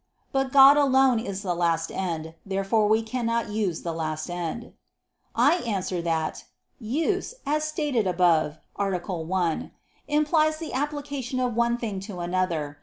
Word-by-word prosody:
But 270 -1 0
God 275 +1 +8
alone 265 -4 +4
is 200 -2 -5
the 180 -3 0
last 170 -1 0
end. 160 -4 -3
Therefore 195 +2 +1
we 220 +1 +3
cannot 230 -1 -1
use 205 -6 -2
the 170 - -2
last 155 +1 -3
end. 175 +6 -5 0.6
I 350 - +4
answer 195 - -2
that, 165 -2 -2 0.3
Use, 320 - -1
as 305 +2 0
stated 295 - 0
above 170 -4 +2 0.2
(A. 195 -2 0 0.2
1), 170 0 -1 0.4
implies 305 +1 +2
the 320 -1 -6
application 280 -2 -3
of 250 -2 0
one 235 +1 +1
thing 215 -5 -4
to 195 -1 -7
another. 175 -5 -2
215 Hz, 145 wpm, -26 LUFS, 175-270 Hz, 0.6 s, God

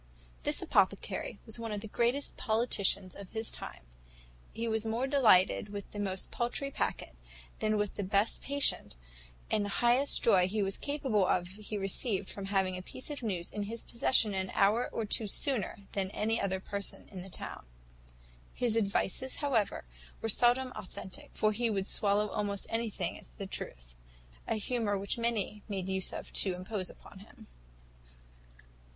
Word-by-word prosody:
"This - - 0
apothecary - - +1
was 220 +1 -5
one 225 -1 -4
of 205 -1 -3
the 220 - -5
greatest 240 +6 +1
politicians 220 -5 +1
of 200 -2 -9
his 220 0 -1
time. - - -4 0.7
He 230 +1 -3
was 220 -1 0
more 225 +3 0
delighted 220 -8 +5
with 205 -1 -7
the 205 - -6
most 190 -2 -2
paultry 245 +3 -2
packet, - - -2 0.4
than 215 0 +2
with 205 -1 0
the 205 - -3
best 200 +3 +1
patient, 280 - +1 0.6
and 210 - +3
the 205 - -2 0.2
highest 255 +4 +3
joy 185 -5 +5
he 210 +2 0
was 195 0 -1
capable 265 -9 +1
of, 175 -1 +1
he 210 +2 -5
received 195 0 0
from 200 - -5
having 190 -2 +1
a 185 - -5
piece 255 +9 -6
of 290 - -5
news 185 -7 -2
in 210 - -3
his 230 0 -5
possession 235 -3 +3
an 190 -1 -1
hour 215 +5 +4
or 225 - -2
two 215 +1 +1
sooner 225 -2 +1
than 190 -2 -1
any 220 +3 0
other 190 -1 0
person 200 +1 -5
in 190 -3 -7
the 190 - -9
town. - - -6 0.9
His 240 -3 +1
advices, 225 +4 +1
however, 245 - 0 0.3
were 225 - -2
seldom 245 +4 +4
authentic; 190 -2 -7
for 215 - +3
he 230 +2 0
would 195 -3 0
swallow 205 0 +3
almost 200 -1 -2
anything 220 -6 -2
as - - -15
a 200 - -3
truth - - -6 0.5
a 225 - +1
humour 215 -2 0
which 200 +4 -2
many 220 -3 -1
made 190 -2 -2
use 190 -1 +2
of - - -7
to 190 -3 +4
impose 185 0 -4
upon 190 - -13
him. 200 - -15
210 Hz, 170 wpm, -32 LUFS, 195-230 Hz, 0.9 s, delighted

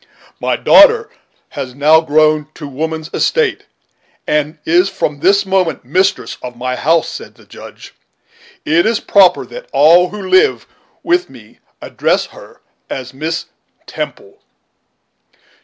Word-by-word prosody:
"My - - -1
daughter 455 -1 +5 0.4
has 130 -2 -7
now 155 +3 +4
grown 155 -1 +2
to 150 - -8
woman's 160 +3 -5
estate, 470 -2 0 0.6
and 150 +1 -1
is 175 +4 +2
from 150 -6 -3
this 200 +5 +2
moment 190 -7 -1
mistress 190 +8 -1
of 125 -1 -9
my 125 +1 -3
house," 165 +4 +1
said - - -9
the - - -21
Judge; - - -13 0.7
"it 170 +5 +2
is 225 -1 0
proper 195 -3 +3
that - - -11
all 170 +5 +4
who 210 - -8
live 410 - +2 0.4
with 355 +1 0
me - - -17 0.2
address - - -1
her - - -16 0.3
as 130 -1 -6
Miss 155 +4 -4 0.4
Temple. 420 -1 -8
165 Hz, 130 wpm, -15 LUFS, 150-200 Hz, 0.7 s, daughter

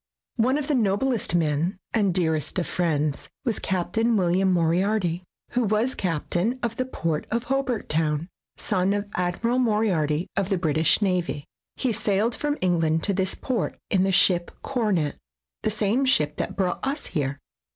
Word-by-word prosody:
One 255 +5 +3
of 295 -2 -3
the 305 - +1
noblest 230 -1 +1
of - - +4
men 165 +4 0 0.2
and 205 -4 +2
dearest 160 -3 0
of 180 - 0
friends 150 -4 -1 0.2
was 230 -5 0
Captain 220 +5 0
"William 185 +1 +2
Moriarity, 175 +1 +1 0.3
who 245 0 +1
was 220 +4 +1
captain 180 - -1
of 230 -1 -2
the 255 - 0
port 165 -11 -2
of 235 +1 -1
Hobart 260 -3 -1
Town, 155 0 0 0.3
son 185 +2 0
of 205 0 -2
Admiral 180 +8 0
Moriarity 190 - +1
of 195 -1 0
the 195 - +1
British 160 +3 +2
Navy. 180 -6 -1 0.3
He 255 - 0
sailed 210 +3 +1
from 295 0 -1
England 165 -3 +2
to 200 - +1
this 190 0 0
port 245 -7 -2
in 190 - +3
the 195 +1 +2
ship 175 -1 +4
Coronet, 210 - 0 0.4
the - - +1
same 215 +5 +1
ship 150 - +2
that - - -3
brought 185 -2 0
us 280 +3 -2
here. 140 -4 -2
190 Hz, 165 wpm, -25 LUFS, 170-230 Hz, 0.4 s, of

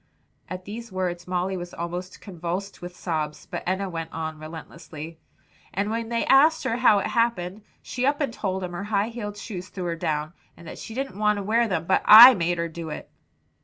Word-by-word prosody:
At 185 0 -6
these 230 +2 -8
words 180 -2 -3
Molly 180 +1 -1
was 175 -1 -7
almost 175 +2 -6
convulsed 185 +1 -5
with 175 0 -8
sobs, 155 -4 -3
but - - -5
Enna 190 +2 0
went 165 -3 -5
on 160 -1 -5
relentlessly. 160 0 -9 0.6
"And 200 +3 -1
when 230 0 -3
they 235 -1 0
asked 305 +4 +5
her 230 - -1
how 240 -4 +5
it 200 - -1
happened, 220 -5 0 0.2
she 250 - -4
up 285 +2 +2
and 280 -6 -1
told 190 -4 -3
them 180 - -4
her 175 +3 -5
high 205 +1 0
heeled 210 -3 -6
shoes 185 -4 -7
threw 185 - -6
her 170 -1 -2
down, 155 0 -2 0.2
and 170 - -13
that - - -8
she 225 - -8
didn't 270 -5 -4
want 210 -1 +2
to 200 - -3
wear 230 +3 +2
them, 165 -5 -2
but 190 - +2
I 235 +4 +12
made 175 -4 0
her 170 0 -1
do 165 0 -7
it." 150 - -8
185 Hz, 210 wpm, -25 LUFS, 170-220 Hz, 0.6 s, I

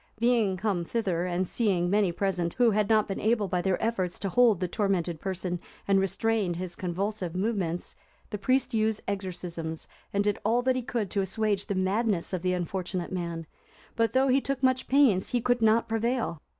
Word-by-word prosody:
Being 230 -5 +2
come 190 -3 -1
thither, 180 -3 -1
and 180 +1 -1
seeing 190 -6 +1
many 200 -1 +2
present, 175 -2 -1
who 240 -2 +4
had 210 0 +1
not 215 -1 +4
been 195 - -3
able, 215 -2 +1
by 180 0 0
their 190 0 0
efforts, 190 -6 -1
to 195 - -3
hold 230 -2 +4
the 180 - -1
tormented 180 -4 -1
person 180 -1 -3 0.3
and 195 -1 +4
restrain 195 -1 0
his 180 0 -5
convulsive 185 0 -3
movements, 185 -4 -2 0.4
the 210 - -3
priest 255 +4 +1
used 220 -1 +1
exorcisms, 175 -5 -4 0.2
and 200 0 +1
did 205 0 0
all 235 +3 +2
that 260 0 +2
he 255 - -1
could 230 -5 -3
to 200 - +1
assuage 200 +1 -1
the 200 - -1
madness 190 0 0
of 185 - -1
the 180 0 +1
unfortunate 180 0 -3
man, 170 -3 -4 0.5
but, 230 0 +1
though 265 +1 +3
he 265 +2 +4
took 275 -1 -3
much 260 0 +2
pains, 255 -9 +4
he 245 - +3
could 245 0 +1
not 225 +1 +4
prevail. 225 -6 -1
200 Hz, 190 wpm, -28 LUFS, 180-225 Hz, 0.5 s, who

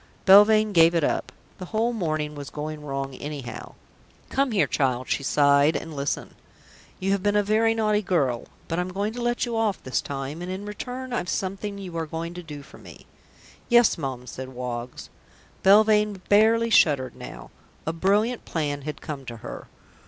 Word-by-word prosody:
Belvane 210 +2 +7
gave 165 -1 +6
it 165 - +2
up. - - -1 0.3
The 185 - -6
whole 225 +5 0
morning 155 -7 -2
was 145 -2 -7
going 150 0 -6
wrong 135 -1 -4
anyhow. 135 -4 -7 0.5
"Come 275 0 +1
here, 210 -5 +2
child," 130 -3 0
she - - 0
sighed, 140 +2 +4
"and 160 -2 -5
listen. 140 0 -3 0.7
You 190 +1 0
have 200 -1 +1
been 205 +1 +1
a 205 - +4
very 220 +2 +2
naughty 215 -2 +2
girl, 140 - 0 0.2
but 165 - -2
I'm 180 +1 -2
going 200 +3 -2
to 245 - -5
let 240 +1 0
you 235 -1 -3
off 220 -3 0
this 130 - -1
time, 140 +3 -5
and 175 - -5
in 190 +2 -5
return 250 +5 -6
I've 180 -7 -2
something 195 +2 -3
you 185 -4 -8
are 165 -1 -2
going 165 +2 -5
to 180 - -7
do 150 -4 -9
for - - -15
me." - - -14 0.6
"Yes, 240 -2 +5
Mum," 130 -5 -5
said 130 +1 -7
Woggs. 125 -1 -6 0.5
Belvane 210 0 +5
barely 225 +2 +4
shuddered 135 - +3
now. - - -10 0.3
A - - -1
sudden 165 0 -5
brilliant 210 +6 +2
plan 145 -3 -2
had 150 +2 -6
come 145 -3 -6
to 120 -2 -7
her. - - -7
175 Hz, 185 wpm, -25 LUFS, 145-210 Hz, 0.7 s, Belvane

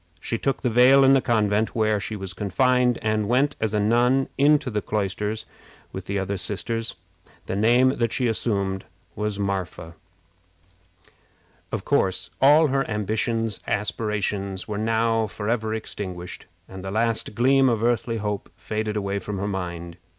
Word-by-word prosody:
She 115 +4 -3
took 135 - -1
the 125 - +2
veil 130 +4 +6
in 135 - +6
the 135 -1 +5
convent 110 -3 +1
where 110 -2 +2
she 105 +2 -5
was 95 -2 -6
confined, 125 +5 +2
and 110 -1 0
went 135 +4 +2
as 110 -2 0
a 105 - +1
nun 120 +5 +2
into 145 -2 +3
the 105 -1 -1
cloisters 105 +1 -2 0.5
with 95 -1 -7
the 100 - -2
other 100 +1 -2
sisters. 115 +4 -3 0.5
The - - -3
name 120 +5 +4
that 115 -2 0
she 125 - 0
assumed 100 -4 -1 0.3
was 105 -1 -2
Marpha. 95 -4 -3 1.8
Of - - -3
course, 95 -1 +1
all 150 +3 +6
her 135 0 +1
ambitious 110 +1 -1
aspirations 105 -2 -2
were 105 -1 -3
now 115 0 +1
forever 110 +2 -2
extinguished, 95 -5 -6 0.2
and 95 0 -9
the 95 - -4
last 110 +1 0
gleam 135 +2 +4
of 115 -2 0
earthly 120 -1 +1
hope 105 -1 -3
faded 110 0 -3
away 100 -1 -1
from 105 0 -5
her 100 +2 -2
mind. 85 -3 -5
110 Hz, 155 wpm, -24 LUFS, 100-120 Hz, 1.8 s, veil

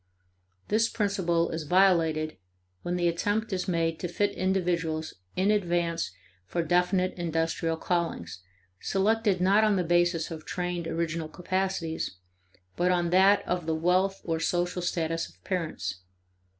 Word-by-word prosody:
This 225 +2 +3
principle 175 -5 0
is 160 - -3
violated 165 -3 +3 0.4
when 175 - -2
the 175 -1 +1
attempt 205 +6 0
is 185 +1 -2
made 165 -2 0
to 180 - -2
fit 205 +4 0
individuals 175 -4 -1 0.2
in 190 +3 +2
advance 175 -4 0 0.4
for 170 - -1
definite 180 +2 +2
industrial 165 -1 -1
callings, 160 - -2 0.4
selected 205 0 +1
not 195 +4 +4
on 215 -1 +4
the 185 - +1
basis 175 -1 +2
of 160 -1 -6
trained 175 -1 -3
original 165 -1 -2
capacities, 180 - -2 0.6
but 180 +1 +2
on 175 -1 +1
that 195 +2 +5
of 175 -2 -1
the 160 - +1
wealth 185 +4 +1
or 165 -2 -1
social 175 +2 0
status 165 -1 -1
of - - -24
parents. 155 - -3
175 Hz, 135 wpm, -28 LUFS, 165-190 Hz, 0.6 s, that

